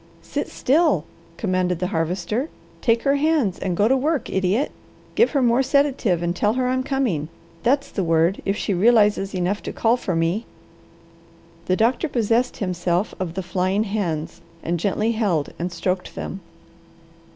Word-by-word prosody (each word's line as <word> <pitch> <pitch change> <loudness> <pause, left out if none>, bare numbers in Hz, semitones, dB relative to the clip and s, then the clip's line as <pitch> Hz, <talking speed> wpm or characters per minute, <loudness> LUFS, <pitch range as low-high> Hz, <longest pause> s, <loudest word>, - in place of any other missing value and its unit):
"Sit - - -3
still!" 315 +5 +2 0.3
commanded 185 -4 0
the 180 - -2
Harvester. 180 - -1 0.3
"Take 230 -1 +2
her 280 0 +3
hands 290 - +1
and 180 -2 -2
go 205 - +4
to 265 - +4
work, 295 +2 0
idiot! 190 +8 +1 0.4
Give 465 - +4
her 275 -3 +2
more 240 +2 +4
sedative, 265 - +1
and 175 +1 -1
tell 210 +4 +2
her 255 0 0
I'm 260 +1 +1
coming. 250 - -1 0.3
That's 275 +6 +1
the 195 - -1
word, 165 +2 +2
if 195 +1 -1
she 200 - -1
realizes 205 -1 +3
enough 185 +3 -1
to - - -5
call 230 +2 +2
for 185 -7 -2
me." 165 +7 0 1.2
The 185 - +3
doctor 240 - +1
possessed 235 0 +1
himself 180 0 -1
of 175 -3 -3
the 190 - -3
flying 185 +3 0
hands, 175 -6 -3 0.2
and 170 0 -1
gently 210 +5 0
held 200 -10 0
and 175 +2 -2
stroked 180 +1 -2
them. 195 - -5
205 Hz, 160 wpm, -22 LUFS, 180-250 Hz, 1.2 s, go